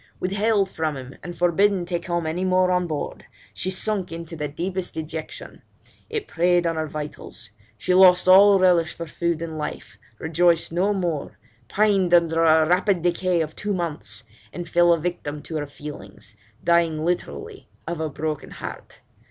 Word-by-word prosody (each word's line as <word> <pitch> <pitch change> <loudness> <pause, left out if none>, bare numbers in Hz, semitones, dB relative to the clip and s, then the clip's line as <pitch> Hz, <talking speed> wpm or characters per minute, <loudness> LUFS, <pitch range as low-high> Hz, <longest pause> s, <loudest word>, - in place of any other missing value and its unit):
Withheld 200 +2 +1
from 155 -5 -3
him, 130 0 -9
and 175 -1 -8
forbidden 180 +2 +2
to 175 -1 -2
come 170 -2 -2
any 165 +4 -2
more 185 0 +3
on 180 -1 +1
board, 150 -3 -5 0.3
she 185 - -3
sunk 190 -1 -1
into 165 0 -7
the 150 -2 -3
deepest 180 +5 -3
dejection; 160 0 -6 0.5
it 440 -2 -3
preyed 175 +1 +2
on 165 -1 0
her 160 0 -2
vitals; 150 -7 -7 0.3
she 180 - 0
lost 185 -1 +6
all 195 +2 +8
relish 175 -4 +3
for 170 - -5
food 170 +1 -2
and 160 -2 -5
life, 120 -7 -6 0.2
rejoiced 165 +2 +2
no 180 +5 +1
more, 175 -7 -2 0.3
pined 195 -4 +3
under 165 -1 +3
a 160 -1 +5
rapid 180 +1 +2
decay 175 0 +1
of 155 0 -4
two 205 -1 -2
months, 170 -8 -3 0.3
and 175 -1 -6
fell 175 +1 +4
a 170 - +4
victim 150 -3 -4
to 160 - -5
her 145 -1 -3
feelings, 105 -8 -10 0.3
dying 165 -2 +2
literally 400 - -4 0.2
of 170 -1 -4
a 160 -1 -2
broken 150 +1 -4
heart. - - -9
170 Hz, 170 wpm, -23 LUFS, 160-185 Hz, 0.5 s, all